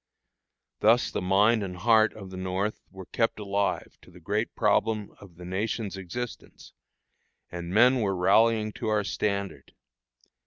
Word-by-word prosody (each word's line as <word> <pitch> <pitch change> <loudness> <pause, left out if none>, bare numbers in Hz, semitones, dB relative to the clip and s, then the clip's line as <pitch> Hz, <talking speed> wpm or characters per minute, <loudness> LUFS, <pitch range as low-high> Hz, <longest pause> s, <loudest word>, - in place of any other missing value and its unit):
Thus 115 +3 +3
the - - -3
mind 105 +5 +3
and 90 -2 -5
heart 110 +2 +4
of 95 -3 -10
the - - -8
North 95 +3 -2
were 95 -1 -11
kept 115 +4 -1
alive 100 -1 -2
to - - -18
the 90 0 -15
great 105 +6 -2
problem 105 0 +1
of 95 -4 -15
the 90 +1 -11
nation's 100 +3 -3
existence, 105 +6 -8 0.8
and 85 -1 -6
men 125 +6 +5
were 100 -2 0
rallying 110 +4 +3
to - - -6
our 105 -1 +1
standard. 100 -1 -3
100 Hz, 150 wpm, -27 LUFS, 95-110 Hz, 0.8 s, men